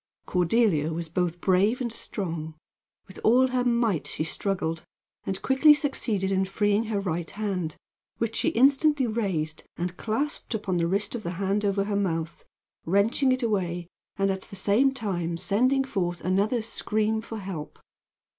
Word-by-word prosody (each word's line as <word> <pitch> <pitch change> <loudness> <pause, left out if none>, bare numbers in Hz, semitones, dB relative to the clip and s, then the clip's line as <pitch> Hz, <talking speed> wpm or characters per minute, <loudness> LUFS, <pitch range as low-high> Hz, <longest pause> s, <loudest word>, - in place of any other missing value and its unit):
Cordelia 180 -4 +2
was 165 0 -4
both 175 0 -1
brave 195 +6 +3
and 235 -3 -2
strong. 165 -8 -4 0.5
With 190 - -11
all 255 +4 +5
her 250 -1 +1
might 235 -8 +1
she - - -1
struggled, 165 -2 -2 0.5
and 190 -1 -2
quickly 295 +3 +6
succeeded 220 -10 -1
in 190 0 +2
freeing 205 +3 +1
her 215 -2 -1
right 175 -4 -2
hand, 190 -6 -3 0.4
which 230 0 -2
she - - +2
instantly 275 +2 +4
raised 190 -9 -2
and 180 +1 -3
clasped 240 +2 -2
upon 195 -4 -1
the 170 -1 +1
wrist 200 +3 0
of 240 - -3
the 175 -3 -4
hand 200 +2 0
over 200 -1 +1
her 205 0 -2
mouth, 170 -4 -2 0.4
wrenching 210 - +2
it 255 0 0
away 180 -6 -1 0.3
and 195 0 +2
at 190 0 -3
the 195 - -11
same 210 +8 +3
time 180 -9 -3
sending 255 +9 +2
forth 180 -9 -2
another 205 +5 +1
scream 220 -1 0
for 225 0 -7
help. 185 -7 -6
200 Hz, 160 wpm, -26 LUFS, 180-230 Hz, 0.5 s, quickly